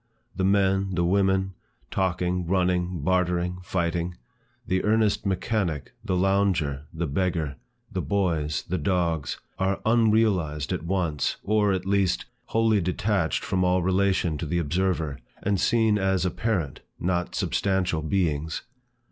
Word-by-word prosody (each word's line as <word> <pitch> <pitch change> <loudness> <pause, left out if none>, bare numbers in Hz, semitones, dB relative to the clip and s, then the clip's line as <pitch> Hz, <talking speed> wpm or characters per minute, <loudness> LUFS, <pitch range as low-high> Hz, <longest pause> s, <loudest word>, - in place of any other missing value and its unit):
The 95 - -1
men, 95 -1 +2
the 85 0 +1
women, 95 +1 +2 0.4
talking, 90 -1 0
running, 90 -2 +1
bartering, 90 0 +1
fighting, 85 -1 -1 0.5
the 95 0 0
earnest 105 -1 +2
mechanic, 95 - -1
the 95 - -1
lounger, 90 -7 +1
the 85 +1 -2
beggar, 80 -2 -1 0.3
the - - -2
boys, 85 -7 0
the 95 - -1
dogs, 85 -6 0 0.2
are 95 +1 +1
unrealized 105 -9 +2
at 90 - -2
once, 85 -6 0
or, 105 0 +2
at 95 -1 -1
least, 100 -2 +1 0.2
wholly 110 -2 +2
detached 90 -1 0
from 90 0 +1
all 90 0 +2
relation 95 -4 +1
to 80 - -3
the 85 - 0
observer, 85 -3 0 0.2
and 100 -1 +1
seen 110 -3 +3
as 95 -2 +1
apparent, 90 - -1 0.2
not 90 0 -1
substantial 95 -5 0
beings. 80 -2 -1
90 Hz, 130 wpm, -26 LUFS, 85-95 Hz, 0.5 s, seen